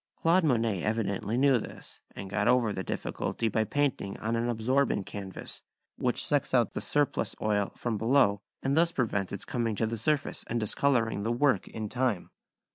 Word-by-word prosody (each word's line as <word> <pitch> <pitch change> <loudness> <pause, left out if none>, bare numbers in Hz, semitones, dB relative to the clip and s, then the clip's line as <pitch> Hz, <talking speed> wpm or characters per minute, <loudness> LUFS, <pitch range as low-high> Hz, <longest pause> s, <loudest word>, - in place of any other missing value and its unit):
Claude 170 +3 +3
Monet 115 - +1
evidently 105 +1 -1
knew 135 -2 +4
this, - - -10 0.2
and 95 - -6
got 105 +2 0
over 120 -4 +3
the 95 - -3
difficulty 115 - -2
by 110 0 +1
painting 130 -6 -1
on 110 +2 -2
an 115 +1 0
absorbent 120 -1 +1
canvas, 95 -2 -6 0.3
which - - 0
sucks - - +1
the - - +1
surplus 145 -2 0
oil 105 -2 +1
out - - -19
from 115 -4 -2
below 115 -4 +3 0.2
and 135 +1 +1
thus 170 +1 +4
prevents 105 - -1
its 100 - -5
coming 115 -3 -1
to 110 - 0
the 115 0 -3
surface 145 +5 -1
and 120 - -1
discolouring 115 0 +1
the 115 +3 -1
work 120 -4 +2
in 110 -1 -5
time. 120 -5 -1
115 Hz, 180 wpm, -29 LUFS, 105-130 Hz, 0.3 s, knew